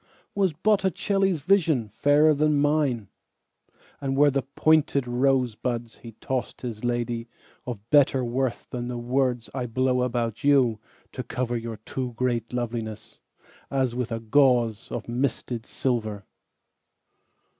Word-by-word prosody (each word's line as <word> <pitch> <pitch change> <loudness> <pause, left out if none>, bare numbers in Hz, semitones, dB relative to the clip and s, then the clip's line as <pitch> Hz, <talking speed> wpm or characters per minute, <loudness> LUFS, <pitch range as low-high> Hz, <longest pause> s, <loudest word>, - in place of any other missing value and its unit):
Was 195 -3 +2
Botticelli's 195 0 +1
visionFairer 150 - +3
than 150 0 +2
mine; 145 -7 +1 0.9
And 135 -1 -1
were 145 0 +5
the 135 0 +1
pointed 140 +1 +2
rosebudsHe 120 -2 -1
tossed 130 -2 -3
his 115 -4 -5
ladyOf 120 -1 -1 0.6
better 140 -3 +5
worthThan 120 0 -2
the 125 -1 -4
words 125 0 -1
I 125 -2 -3
blow 125 +2 +1
about 120 -3 -1
youTo 130 -6 +3 0.5
cover 120 0 -2
your 115 -1 -4
too 125 +3 -5
great 120 -2 -1
lovelinessAs 120 +2 -5
with 125 -1 -3
a 115 - -2
gauzeOf 120 -2 +1
misted 120 -1 -2
silver? 110 -6 -2
125 Hz, 105 wpm, -25 LUFS, 115-140 Hz, 0.9 s, were